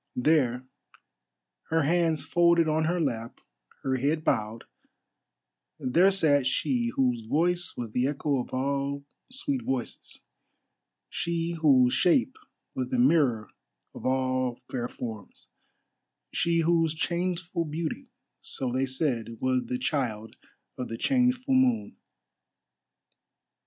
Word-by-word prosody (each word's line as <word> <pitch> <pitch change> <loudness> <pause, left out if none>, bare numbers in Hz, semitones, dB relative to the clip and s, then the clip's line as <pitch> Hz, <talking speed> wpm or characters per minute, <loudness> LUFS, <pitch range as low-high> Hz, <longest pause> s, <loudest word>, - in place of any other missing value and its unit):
There, 125 -3 +2 1.0
her 160 -1 +2
hands 165 0 +1
folded 170 -1 +3
on 155 0 +1
her 175 +2 0
lap, 120 -7 -3 0.4
her 130 -1 0
head 150 +5 0
bowed—there 110 - -2
sat 145 -8 +3
she 235 - 0
whose 125 -4 0
voice 175 +6 +1
was 120 -3 -5
the 125 +3 +1
echo 145 -1 -1
of 125 - -5
all 140 +1 -2 0.2
sweet 265 +1 -1
voices, 130 - -4 0.9
she 170 0 -2
whose 135 -7 +4
shape 240 - +2 0.4
was 130 -1 -2
the 125 - -2
mirror 125 -4 +3 0.4
of - - -10
all 130 -1 0
fair 120 -2 -2
forms, 110 -5 -8 0.8
she 170 0 +2
whose 165 -1 +2
changeful 175 +1 -2
beauty, 170 - -4 0.3
so 130 -2 -2
they 130 +2 0
said, 125 -5 -2
was 130 -1 0
the 125 - -2
child 125 -5 -2 0.4
of 125 - -3
the 115 - -5
changeful 255 - +1
moon. 255 -3 +2
145 Hz, 115 wpm, -27 LUFS, 125-170 Hz, 1.0 s, whose